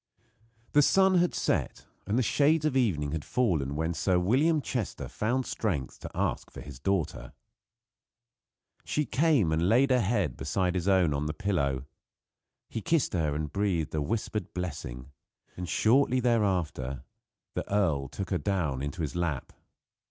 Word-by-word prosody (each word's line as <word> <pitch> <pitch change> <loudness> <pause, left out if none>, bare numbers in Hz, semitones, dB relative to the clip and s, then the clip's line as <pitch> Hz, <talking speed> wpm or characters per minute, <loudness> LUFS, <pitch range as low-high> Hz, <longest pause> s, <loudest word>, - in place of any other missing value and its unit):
The 145 - +5
sun 190 +4 +4
had 175 0 +1
set - - -1 0.2
and 105 +4 +1
the 130 - +3
shades 150 +7 +3
of 150 -4 +1
evening 85 - +1
had 80 -1 -3
fallen 80 - 0
when 80 +2 -1
Sir 90 +3 +1
William 135 - +3
Chester 125 -6 -3
found 125 +4 -1
strength 80 -12 -3
to - - -7
ask - - -1
for - - -11
his 70 -3 -10
daughter. 80 -7 -2 1.5
She 150 - -1
came 135 - +2
and 80 +3 +2
laid 130 +5 +4
her 125 -1 +4
head 115 +4 0
beside 90 -2 0
his 90 0 -2
own 95 -6 +4
on 70 +1 -1
the 75 - -3
pillow. 70 -9 -1 0.8
He 115 - -5
kissed 160 +4 +1
her 80 -5 0
and 75 0 -3
breathed 95 -6 0
a 75 - 0
whispered 105 +1 -3
blessing; 70 -7 -5 0.4
and 90 -1 -5
shortly 130 +3 +3
thereafter 90 - 0 0.5
the - - -4
earl 80 -10 +1
took 95 +9 -6
her 90 - +1
down 85 -10 -1
into 75 +4 -4
his 75 - -4
lap. 85 -6 -2
95 Hz, 160 wpm, -29 LUFS, 75-120 Hz, 1.5 s, The